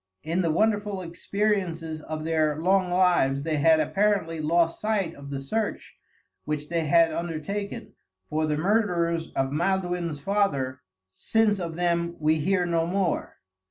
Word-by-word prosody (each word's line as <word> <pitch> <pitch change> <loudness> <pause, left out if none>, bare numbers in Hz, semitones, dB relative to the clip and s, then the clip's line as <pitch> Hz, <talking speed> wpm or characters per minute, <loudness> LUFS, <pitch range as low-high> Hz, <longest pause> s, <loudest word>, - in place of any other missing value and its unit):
In 165 +4 0
the 170 - +1
wonderful 205 +2 +1
experiences 170 -3 -2
of 155 0 -5
their 155 -2 +1
long 185 +2 +2
lives 175 -7 +2
they 155 -1 -1
had 160 +2 +5
apparently 185 0 +1
lost 165 +2 +1
sight 205 -6 0
of 140 0 -11
the 140 -1 -4
search 210 +11 -3 0.5
which 150 0 -4
they 165 -2 -1
had 165 0 +4
undertaken, 175 +7 -4 0.3
for 155 +1 -1
the 150 -1 0
murderers 170 -3 +1
of 135 0 0
Maelduin's 175 -1 -1
father, 140 -9 0 0.3
since 210 - +1
of 170 -2 -4
them 170 0 0
we 155 +1 +2
hear 180 +3 +1
no 165 -1 0
more. 185 -2 -1
170 Hz, 145 wpm, -26 LUFS, 155-195 Hz, 0.5 s, had